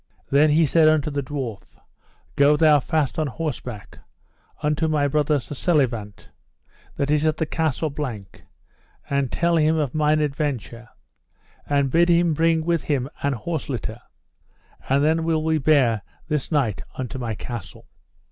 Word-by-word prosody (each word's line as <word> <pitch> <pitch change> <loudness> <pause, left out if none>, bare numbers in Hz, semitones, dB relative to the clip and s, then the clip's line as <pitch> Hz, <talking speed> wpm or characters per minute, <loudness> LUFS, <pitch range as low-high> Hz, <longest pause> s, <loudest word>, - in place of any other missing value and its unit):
Then 145 +3 +5
he 160 +2 +4
said 155 +2 +4
unto 155 -1 +2
the 140 0 -1
dwarf: 130 -7 -6 0.6
Go 145 +1 +4
thou 155 -2 +5
fast 155 +1 -1
on 155 - 0
horseback, 125 -7 -6 0.6
unto 150 +2 +1
my 150 -2 +1
brother 150 +1 +1
Sir 135 - -8
Selivant, 125 - -1 0.7
that 140 +1 -1
is 150 0 +2
at 155 0 +1
the 160 - 0
Castle 155 -1 -1
Blank, 120 -10 -6 0.7
and 140 -2 0
tell 170 0 +1
him 160 +1 +3
of 145 -5 -1
mine 155 0 +2
adventure, 135 -6 -3 0.8
and 140 -2 +1
bid 170 +3 +3
him 170 -1 +3
bring 160 +1 +1
with 170 -3 0
him 140 -2 -1
an 140 0 0
horse 155 +6 -4
litter, 115 -3 -4 0.9
and 140 +2 +3
then 160 +1 +2
will 160 -1 0
we 160 0 +1
bear 130 -7 +3 0.3
this 150 -2 -2
knight 135 -10 0 0.2
unto 130 +1 -5
my 115 -3 -3
castle. 120 -3 -8
150 Hz, 155 wpm, -23 LUFS, 130-155 Hz, 0.9 s, Then